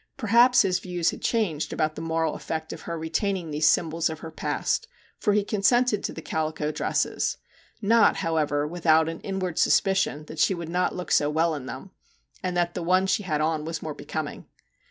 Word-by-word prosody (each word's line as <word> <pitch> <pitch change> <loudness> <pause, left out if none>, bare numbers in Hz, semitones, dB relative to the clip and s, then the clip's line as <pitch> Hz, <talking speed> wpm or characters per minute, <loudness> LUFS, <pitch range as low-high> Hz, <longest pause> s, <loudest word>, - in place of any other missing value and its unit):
Perhaps 240 +1 +5
his 185 -2 +1
views 180 -3 -1
had - - -9
changed 190 -10 0
about 155 -1 0
the 155 - -7
moral 160 -1 0
effect 160 0 -5
of - - -9
her 170 - -3
retaining 170 +1 -2
these 150 +1 +2
symbols 165 0 +2
of 160 0 -7
her 160 - -7
past, - - -1 0.3
for 210 - +2
he 210 0 +2
consented 215 +2 +2
to - - -2
the 160 - -9
calico 155 -1 -2
dresses, 150 - -1 0.5
not, 225 +2 +5
however, 155 -4 0
without 160 -1 +3
an 165 0 -4
inward 185 -4 -3
suspicion 190 -7 +2
that 155 - -9
she 190 - +3
would 170 -2 -6
not 180 +1 0
look 180 - -6
so 145 - +3
well 160 +2 +1
in 140 -4 -6
them, 135 +10 -8 0.5
and 180 -1 -2
that 175 0 +1
the - - -4
one 185 +3 +3
she 190 +2 +1
had 155 -6 -1
on 155 0 0
was 160 +1 -5
more 155 - -4
becoming. - - -6
165 Hz, 195 wpm, -26 LUFS, 155-190 Hz, 0.5 s, Perhaps